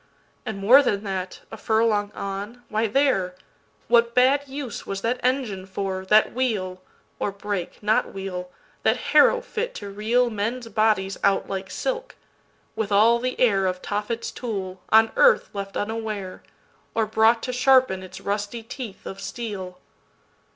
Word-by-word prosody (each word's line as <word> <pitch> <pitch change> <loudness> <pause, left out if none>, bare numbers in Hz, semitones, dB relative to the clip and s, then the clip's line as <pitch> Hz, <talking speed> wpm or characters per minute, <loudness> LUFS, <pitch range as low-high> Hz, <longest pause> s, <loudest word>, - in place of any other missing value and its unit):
And 220 - -3
more 230 +8 +7
than 205 -7 0
that—a 190 -2 -5
furlong 220 -2 +1
on—why, 215 +3 -3
there! 210 -7 +1 0.5
What 235 0 +3
bad 270 +3 +4
use 270 -4 -6
was 195 0 -4
that 240 +4 -1
engine 245 -8 -1
for, 190 -1 -3
that 215 +2 +4
wheel, 200 -8 -1 0.4
Or 205 - -1
brake, 200 -1 -5
not 215 +1 +2
wheel—that 180 -2 -3
harrow - - +4
fit 485 0 -4
to 200 -1 -7
reelMen's 230 +2 0
bodies 210 -3 +1
out 200 0 +2
like 190 -1 -4
silk? - - -3 0.6
with 215 -2 -2
all 225 +4 +5
the 255 +1 -2
airOf 195 -6 +2
Tophet's 210 +3 -3
tool, 190 -6 -5
on 220 +1 +5
earth - - +4
left 200 -1 -5
unaware, 215 -3 -4 0.5
Or 225 - +2
brought 220 +2 +3
to 250 - -3
sharpen 255 -6 +4
its 185 - -10
rusty 205 +3 -3
teeth 230 -3 -8
of 195 0 -7
steel. 195 -3 -6
215 Hz, 135 wpm, -24 LUFS, 195-240 Hz, 0.6 s, more